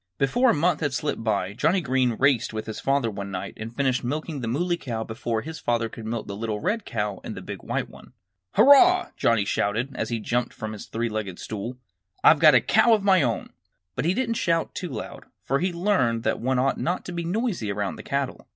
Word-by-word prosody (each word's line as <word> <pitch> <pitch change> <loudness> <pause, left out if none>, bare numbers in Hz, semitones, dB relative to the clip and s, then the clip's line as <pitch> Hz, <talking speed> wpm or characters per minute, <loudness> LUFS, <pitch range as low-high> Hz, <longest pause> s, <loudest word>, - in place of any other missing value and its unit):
Before 245 - +3
a - - +5
month 160 +1 +2
had 145 -4 -1
slipped 145 -5 -2
by 100 -3 0
Johnnie 165 - +2
Green 130 -5 +1
raced 135 -5 +2
with 110 0 -4
his 110 - -6
father 135 -4 +1
one 100 -1 -6
night 90 -2 -5
and 115 +2 -8
finished 130 -3 +1
milking 150 +3 -3
the 115 - -3
Muley 175 +9 0
Cow 115 -9 -4
before 110 0 -3
his 160 +1 -7
father 115 -1 0
could 110 0 -8
milk 115 -1 -3
the 100 - -6
little 110 0 -3
red 205 - -1
cow 105 -1 -3
and - - -6
the - - -6
big - - -7
white - - -2
one. - - -16 0.4
"Hurrah!" 360 +7 +6
Johnnie 115 -4 +2
shouted, 115 +7 -1
as - - -2
he 115 -1 -1
jumped 120 +2 -1
up - - -24
from 110 0 -5
his 105 - -9
three 115 +1 -2
legged 105 -5 -4
stool. 110 +4 -6 0.5
"I've 155 - +7
got 155 -3 +7
a 125 - +6
cow 220 - +4
of 210 - -3
my 190 -3 +5
own!" - - -1 0.4
But - - -2
he 175 +3 +2
didn't 230 -2 0
shout 165 -2 0
too 180 - -5
loud, 115 -6 -7 0.2
for 135 +1 0
he 180 - +1
had 175 - -5
learned 170 - +1
that - - 0
one 130 +2 0
ought 135 +2 +1
not 175 +2 -2
to - - -6
be 170 -1 -3
noisy 180 - -1
around 100 0 -3
the - - -7
cattle. - - -3
130 Hz, 235 wpm, -25 LUFS, 110-170 Hz, 0.5 s, I've